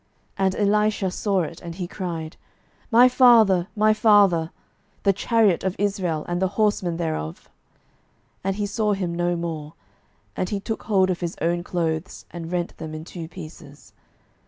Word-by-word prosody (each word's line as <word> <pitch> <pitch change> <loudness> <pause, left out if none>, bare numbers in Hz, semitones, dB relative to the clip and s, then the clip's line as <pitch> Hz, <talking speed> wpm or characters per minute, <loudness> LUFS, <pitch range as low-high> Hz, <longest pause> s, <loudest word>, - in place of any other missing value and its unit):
12:002:012 195 - +2
And 190 - -1
Elisha 210 -2 +1
saw 195 -1 0
it, 165 +2 -7
and 170 -1 -7
he 180 -1 -4
cried, 170 -4 -5 0.5
My 245 +1 +7
father, 225 -8 +5
my 215 0 +4
father, 205 -7 +4 0.5
the 200 - +4
chariot 210 -2 +2
of 190 0 -1
Israel, 185 -6 -1
and 175 +1 -2
the 190 - +3
horsemen 205 -6 +1
thereof. 155 - -4 0.9
And 195 0 -1
he 205 0 -2
saw 210 +1 0
him 185 -3 -2
no 175 0 0
more: 160 -3 -5 0.6
and 185 - -2
he 205 - -2
took 220 +3 -4
hold 190 -3 +3
of 175 - -3
his 175 -1 -4
own 170 +1 0
clothes, 165 -1 -3
and 170 -1 -7
rent 175 -1 -2
them 155 -1 -7
in 155 +1 -7
two 170 -2 -7
pieces. 155 -4 -12
185 Hz, 165 wpm, -23 LUFS, 170-205 Hz, 0.9 s, My